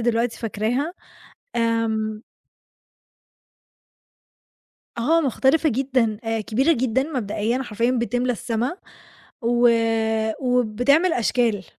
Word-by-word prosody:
دلوقتي 230 0 0
فاكراها. 235 +8 -2 0.6
آمم 225 -2 0 2.8
آه، 315 +8 +2
مختلفة 285 +3 +2
جدًا 250 -4 0
آآ 225 -1 -1
كبيرة 265 +10 +2
جدًا 260 -1 0
مبدئيًا، 240 -4 -2
حرفيًا 235 +1 0
بتملى 245 0 0
السما 240 - -2 0.6
و 240 +1 +3 0.7
وبتعمل 250 +7 +2
أشكال، 230 -4 0
240 Hz, 80 wpm, -22 LUFS, 225-260 Hz, 2.8 s, و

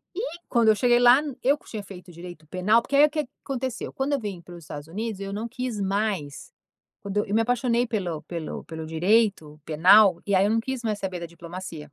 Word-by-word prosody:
e 410 - -2 0.3
quando 235 -3 +4
eu 215 - +5
cheguei 240 +2 +3
lá 245 +3 +7 0.2
eu 280 +3 +4
que - - -22
tinha 215 -3 -5
feito 180 -2 -12
direito 170 -2 -11
penal 200 +8 +2
porque 280 - -3
aí 290 +1 +8
o - - 0
que 305 -1 -1
que 250 - -30 0.2
aconteceu? 260 -3 -4
Quando 270 +2 -1
eu 280 - +1
vim 200 -6 -6
para 175 +1 -12
os 170 - -12
Estados 145 0 -8
Unidos 215 +3 -4
eu 195 0 -5
não 215 +3 -4
quis 250 -2 -4
mais 195 -7 -2 0.5
quando 200 +1 -1
eu 205 - -5
me 225 - +4
apaixonei 245 0 +1
pelo 180 -9 -3
pelo 170 -3 -6
pelo 160 -1 -7
direito 165 -2 +1
penal, 180 +3 +5
e 200 - +2
aí 190 +1 +4
eu 210 - +2
não 225 - +2
quis 260 +1 -4
mais 210 -2 -1
saber 185 -2 -4
da - - -4
diplomacia. 170 0 -8
205 Hz, 230 wpm, -25 LUFS, 175-235 Hz, 0.5 s, aí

